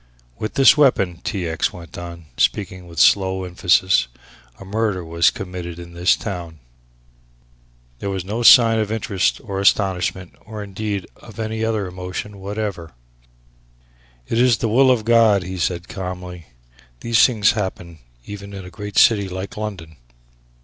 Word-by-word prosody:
"With 110 - -4
this 135 +1 +7
weapon," 100 - +2
T. 95 -4 -3
X. 80 0 -1
went 85 -2 -12
on, 85 -1 -8
speaking 95 -3 -1
with 85 -1 -13
slow 95 +1 +3
emphasis, 90 -2 +2 0.5
"a - - -10
murder 105 -3 -2
was 85 +1 +3
committed 90 -2 -7
in 85 0 -10
this 85 +1 +3
town." 85 -6 -6 1.4
There 100 - -4
was 95 -2 -4
no 110 +5 -3
sign 115 -1 +7
of 105 -1 -2
interest 100 -4 0
or 100 -3 -4
astonishment, 95 -2 +1
or 105 -1 -7
indeed 100 -1 -4
of 110 -3 -15
any 110 0 -3
emotion 100 -2 -4
whatever. 100 -4 -5 1.3
"It 115 - -1
is 125 -2 +4
the 115 - -1
will 130 +4 +4
of 120 -4 +2
God," 115 -4 +4
he 95 +1 -6
said 85 +1 -2
calmly; 90 -3 -7 0.5
"these 115 -1 +3
things 110 -6 +4
happen 90 -5 -5 0.3
even 100 0 -9
in 95 -1 -8
a 90 - -11
great 105 -2 -7
city 100 -4 +5
like 95 +4 -6
London." 95 -7 -7
95 Hz, 150 wpm, -20 LUFS, 90-110 Hz, 1.4 s, this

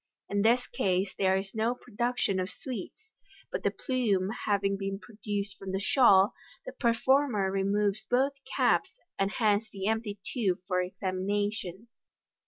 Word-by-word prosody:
In 200 0 +1
this 235 +4 +4
case, 190 -4 0
there 190 -1 +3
is 195 0 -5
no 225 +2 0
production 235 -4 -1
of 185 +1 -2
sweets, 260 - -8 0.4
but - - -2
the - - +2
plume 210 -8 0 0.2
having 200 -1 +2
been 195 0 -3
produced 205 -2 -5
from 190 -1 -6
the 190 - 0
shawl, 200 -3 +5 0.3
the - - -5
performer 235 - +2
removes 200 +1 0
both 265 +3 +3
caps, - - +1 0.3
and 195 0 +2
hands 215 0 +1
the 195 -1 -5
empty 220 -1 -1 0.2
tube 200 -8 +1
for 180 -2 +1
examination. 195 +2 -2
205 Hz, 145 wpm, -29 LUFS, 195-230 Hz, 0.4 s, shawl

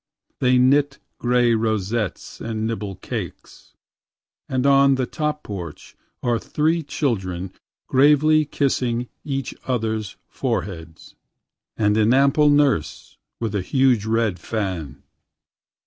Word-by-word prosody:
They 125 0 +3
knit 140 +2 +3 0.2
gray 120 -1 +3
rosettes 110 -1 -2
and 110 -1 -3
nibble 105 -3 -3
cakes.…And 130 +6 -8
on 140 0 +5
the 130 -1 0
top 150 +1 -3
porch 90 -7 -8 0.3
are 120 -2 +1
three 160 +6 0
childrenGravely 140 - +1
kissing 125 -4 0
each 135 -2 -3
others' 110 -6 -2
foreheads—And 90 +4 -4
an 110 +3 +4
ample 140 +2 +4
nurse 145 - +1 0.2
with 115 -3 -3
a 100 - 0
huge 125 0 +2
red 110 -5 0
fan. 95 -8 -4
120 Hz, 100 wpm, -22 LUFS, 105-140 Hz, 0.3 s, on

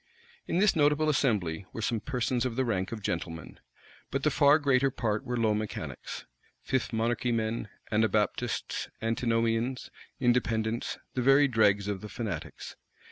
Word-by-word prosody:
In - - 0
this 200 +1 +4
notable 150 0 +3
assembly 100 - 0
were 115 - -5
some 115 0 0
persons 125 -1 -1
of 125 -3 -2
the 130 +1 +1
rank 95 -5 -1
of 110 -3 -6
gentlemen; 80 -6 -4 0.5
but - - -2
the - - +3
far 145 +1 +5
greater 135 -3 +3
part 115 -3 -1
were 125 -2 -3
low 110 -2 +2
mechanics; 105 0 -5 0.4
Fifth 130 -3 -1
Monarchy 120 +2 0
men, 110 -1 -1 0.2
Anabaptists, 105 -2 0
Antinomians, 115 +2 0 0.3
Independents; 115 -2 0 0.2
the 125 - -1
very 135 +3 +6
dregs 105 -5 +3
of 100 -2 -3
the 105 - -8
fanatics. 100 - -5
115 Hz, 145 wpm, -29 LUFS, 110-130 Hz, 0.5 s, very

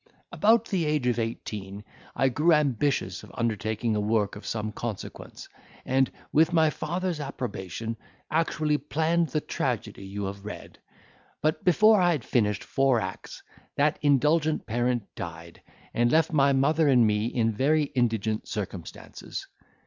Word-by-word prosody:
"About 225 +2 +4
the 185 -7 -1
age 150 -4 0
of 120 -1 +1
eighteen, 105 -3 -5 0.3
I 135 - +3
grew 155 +7 +3
ambitious 145 -2 +1
of - - -13
undertaking 110 -1 -1
a - - +1
work 105 -1 0
of 105 - -9
some 110 -1 -2
consequence; 110 -1 -7 0.4
and, 130 0 +2 0.2
with 160 +3 +4
my 160 -2 +4
father's 175 +1 -3
approbation, 115 - -5 0.4
actually 155 -1 +1
planned 160 +4 +1
the 155 - -1
tragedy 95 - -3
you 100 +1 -5
have 100 0 -5
read; 105 - -9 0.6
but, 155 +1 0
before 215 +3 +5
I 175 -1 +4
had 145 -7 -3
finished 105 -4 0
four 135 -3 +2
acts, 95 -2 -7 0.3
that 150 +2 +2
indulgent 150 +2 +2
parent 120 0 0
died, 85 0 -8 0.3
and 120 0 +2
left 160 +1 +3
my 140 -2 +4
mother 150 +4 +3
and 125 -4 +5
me 105 +1 +1
in 115 -2 +1
very 145 +8 +2
indigent 115 -6 -1
circumstances. 95 -4 -6
130 Hz, 145 wpm, -27 LUFS, 110-155 Hz, 0.6 s, before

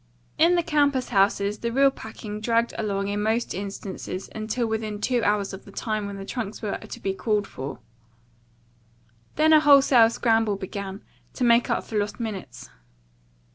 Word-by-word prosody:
In 335 +3 +5
the 345 - +2
campus 285 -5 +1
houses 200 +1 +2
the 235 - -2
real 275 +2 +4
packing 215 -3 -8
dragged 230 +1 +1
along 200 -2 -2
in 205 +1 -1
most 220 +3 0
instances 195 -1 -6
until 220 +2 -2
within 220 -2 -3
two 240 +2 0
hours 205 -1 +1
of 190 - -8
the 200 - -14
time 215 -1 -3
when 200 0 -6
the 195 - -7
trunks 220 -2 -5
were 210 -3 -3
to - - -10
be 195 - -2
called 210 +1 0
for. 135 -5 -7 1.6
Then 315 +1 +4
a 310 - +8
wholesale 275 -6 +6
scramble 225 -2 +1
began, 195 0 -6 0.3
to - - -2
make 235 0 +4
up - - 0
for 215 - -2
lost 205 +2 -3
minutes. 205 - -6
215 Hz, 170 wpm, -25 LUFS, 200-240 Hz, 1.6 s, a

